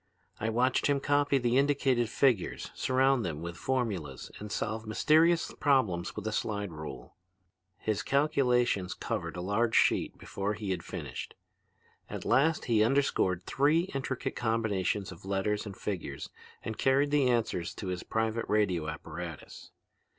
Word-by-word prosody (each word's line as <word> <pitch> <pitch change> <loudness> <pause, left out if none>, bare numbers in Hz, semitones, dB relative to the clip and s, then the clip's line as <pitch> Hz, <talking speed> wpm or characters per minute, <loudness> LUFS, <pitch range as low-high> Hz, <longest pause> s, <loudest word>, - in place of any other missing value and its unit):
I 110 - -1
watched 125 +3 +2
him 140 -1 +2
copy 145 0 +2
the 125 0 +2
indicated 135 -4 +2
figures, 120 -6 +1
surround 130 -1 +2
them 80 -2 -4
with 85 0 -5
formulas, 100 - -2
and 105 0 -7
solve 110 +1 -3
mysterious 160 +9 +3
problems 110 - +2
with 105 - -6
a 110 - -1
slide 100 -3 -2
rule. 75 -6 -9 0.6
"His 110 -1 -1
calculations 125 -8 +2
covered 90 -7 -4
a - - -3
large 105 +5 +1
sheet - - +3
before 100 +2 -3
he 105 -2 -4
had 90 -2 -2
finished. - - -6 0.7
At - - -6
last 150 +6 +3
he 110 -3 +3
underscored 110 -8 +2
three 155 - +2
intricate 135 -1 -3
combinations 105 -4 0
of 90 - -12
letters 100 +2 -1
and 100 -2 -8
figures 85 -9 -5 0.3
and 110 +1 -5
carried 135 +2 +3
the 140 -3 +3
answers 110 -8 0
to 95 - -5
his 90 0 -3
private 110 +1 -1
radio 95 -7 +1
apparatus. 80 -1 -8
110 Hz, 145 wpm, -30 LUFS, 95-130 Hz, 0.7 s, mysterious